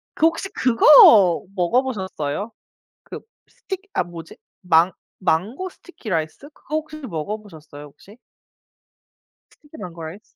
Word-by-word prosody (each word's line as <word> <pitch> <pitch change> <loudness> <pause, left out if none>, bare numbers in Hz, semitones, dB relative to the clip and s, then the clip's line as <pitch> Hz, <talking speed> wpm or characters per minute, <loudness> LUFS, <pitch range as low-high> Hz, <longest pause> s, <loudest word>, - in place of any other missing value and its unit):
그 - - +2
혹시 330 +4 -3
그거 230 - +6
먹어보셨어요? 190 - -2 0.5
그 - - -9 0.3
스틱 385 -1 -8
아 - - 0
뭐지? 170 -2 -11 0.2
망 175 0 +3 0.3
망고 205 - -1
스티키 355 - -13
라이스 165 - -4
그거 305 - -7
혹시 310 0 -5
먹어보셨어요 165 - -8
혹시? 200 - -18 1.3
스티키 305 0 -18
망고 170 - -9
라이스. 165 +6 -8
200 Hz, 265 characters per minute, -21 LUFS, 165-270 Hz, 1.3 s, 그거